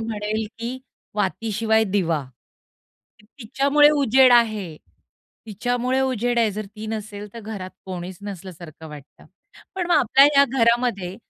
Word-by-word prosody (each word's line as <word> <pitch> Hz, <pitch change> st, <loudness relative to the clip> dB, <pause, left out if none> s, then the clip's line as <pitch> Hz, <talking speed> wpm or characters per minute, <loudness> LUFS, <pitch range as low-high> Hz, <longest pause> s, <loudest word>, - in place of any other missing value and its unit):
म्हणेल, 215 Hz, -1 st, -3 dB
की 240 Hz, +3 st, -5 dB, 0.4 s
वातीशिवाय 220 Hz, +2 st, 0 dB
दिवा. 175 Hz, -7 st, -1 dB, 1.0 s
की 210 Hz, -, -23 dB
तिच्यामुळे 280 Hz, +5 st, +3 dB
उजेड 265 Hz, -2 st, +5 dB
आहे, 215 Hz, -9 st, +2 dB, 0.7 s
तिच्यामुळे 245 Hz, +4 st, -1 dB
उजेड 245 Hz, -2 st, 0 dB
आहे. 225 Hz, -2 st, +2 dB
जर 210 Hz, +1 st, -6 dB
ती 215 Hz, +2 st, -10 dB
नसेल, 210 Hz, -1 st, -6 dB
तर 230 Hz, -, -7 dB
घरात 205 Hz, -4 st, -7 dB, 0.2 s
कोणीच 180 Hz, -1 st, -7 dB
नसल्यासारखं 175 Hz, -5 st, -9 dB
वाटतं. 150 Hz, -2 st, -14 dB, 0.5 s
पण 360 Hz, -2 st, -2 dB
मग 350 Hz, -, +2 dB
आपल्या 265 Hz, +4 st, +5 dB
ह्या 280 Hz, -, +7 dB
घरामध्ये, 230 Hz, -6 st, +1 dB
220 Hz, 130 wpm, -22 LUFS, 195-245 Hz, 1.0 s, ह्या